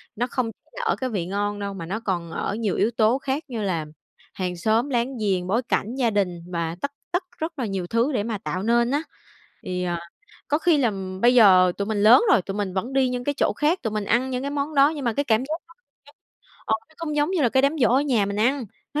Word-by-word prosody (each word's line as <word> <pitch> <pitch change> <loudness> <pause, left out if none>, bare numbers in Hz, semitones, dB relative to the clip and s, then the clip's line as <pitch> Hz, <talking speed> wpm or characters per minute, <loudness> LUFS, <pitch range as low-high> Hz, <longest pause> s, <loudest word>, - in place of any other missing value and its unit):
nó 245 +3 -1
không 250 -2 -2 0.2
là - - -6
ở 440 - +2
cái 260 - -3
vị 195 -7 -2
ngon 205 +2 -2
đâu 200 -1 -4
mà 170 -4 -6
nó 205 +6 -3
còn 175 -6 -3
ở 200 - -2
nhiều 220 -3 -1
yếu 225 - +2
tố 225 +2 +3
khác 275 +3 -3
như 235 -4 -4
là 170 -6 -1 0.5
hàng 180 -1 -3
xóm 220 +8 +1
láng 250 0 -1
giềng, 190 -5 0
bối 225 +6 +1
cảnh, 235 -1 -2
gia 250 -3 +2
đình 195 -5 0
và 170 -1 -2
tất 280 - -2 0.2
tất 355 +1 0
rất 320 -1 -5
là 250 - 0
nhiều 195 -4 -3
thứ 235 +8 +1
để 205 -5 0
mà 220 -2 -3
tạo 190 -2 -4
nên 235 +2 +2
á. 290 +2 +1 0.6
Thì, 180 0 -3
à, 175 -1 -2 0.5
có 295 - +2
khi 325 -2 +3
làm 195 -7 -2
bây 240 +3 +5
giờ 185 -6 +7
tụi 200 - -2
mình 215 -2 -1
lớn 225 - +8
rồi, 225 - +5
tụi 195 - -5
mình 200 -3 -2
vẫn 225 +8 -2
đi 265 -1 +3
những 250 0 -3
cái 285 - 0
chỗ - - +2
khác, 310 +5 +2
tụi 225 - -1
mình 210 -1 -2
ăn 245 +5 +1
những 250 0 -2
cái 280 - -3
món 290 +1 -2
đó 275 0 +6
nhưng 290 -3 -5
mà 235 - +1
cái 285 +5 -1
cảm 220 -4 +2
giác 305 +3 -3
nó 335 - -18 0.3
khác, 290 - -18 0.5
ờ, 220 - +2
nó 315 - -24
không 300 -3 -3
giống 295 +3 +2
như 365 -5 +1
là 245 - +4
cái 265 +3 +2
đám 280 +2 +3
giỗ 235 - +5
ở 265 - +4
nhà 250 -8 +1
mình 200 0 -3
ăn, 250 +5 +1 0.3
nó 300 - 0
230 Hz, 270 wpm, -24 LUFS, 200-270 Hz, 0.6 s, lớn